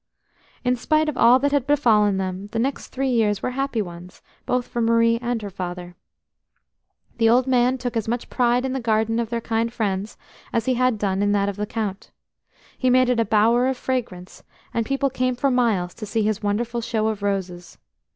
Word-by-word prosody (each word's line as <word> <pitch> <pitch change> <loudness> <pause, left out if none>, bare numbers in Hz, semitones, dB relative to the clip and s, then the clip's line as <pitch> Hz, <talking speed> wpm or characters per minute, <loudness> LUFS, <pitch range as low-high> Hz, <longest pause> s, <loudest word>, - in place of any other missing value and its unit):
In 250 0 +2
spite 310 +5 +1
of 300 - -4
all 240 +1 +6
that 285 +2 0
had 280 -2 0
befallen 215 -9 +3
them, 190 +1 -4
the - - -2
next 260 +4 -2
three 270 +1 -2
years 210 -4 +1
were - - -1
happy 265 -4 -1
ones, 175 0 -11 0.2
both 250 -1 0
for 240 - -3
Marie 230 0 +3
and 240 -1 -1
her 200 - -6
father. 180 -1 -6 1.2
The 225 -1 +4
old 245 +2 +4
man 255 0 +2
took 245 -1 -4
as 225 -2 -1
much 235 +1 -2
pride 245 0 +1
in 260 - -2
the 265 - -2
garden 225 -1 +1
of 230 -2 -2
their 235 0 -2
kind 230 +1 -1
friends 210 -2 -3 0.3
as 230 -1 0
he 260 - +2
had 255 -2 +1
done 195 -2 -1
in 205 0 +2
that 200 -1 +1
of 200 - -5
the 210 +1 -3
Count. 210 -3 -4 0.7
He 255 - 0
made 255 0 +4
it 245 -2 +2
a 230 - +2
bower 225 +4 +3
of 265 -1 -1
fragrance, 220 -9 -4 0.3
and 230 -1 -1
people 275 0 0
came 255 -1 0
for 275 +2 +1
miles 215 -8 +1
to 215 - -8
see 220 +2 0
his 215 0 -1
wonderful 230 +3 -1
show 220 -1 -1
of 215 -2 -4
roses. 185 -4 -3
230 Hz, 210 wpm, -23 LUFS, 205-250 Hz, 1.2 s, all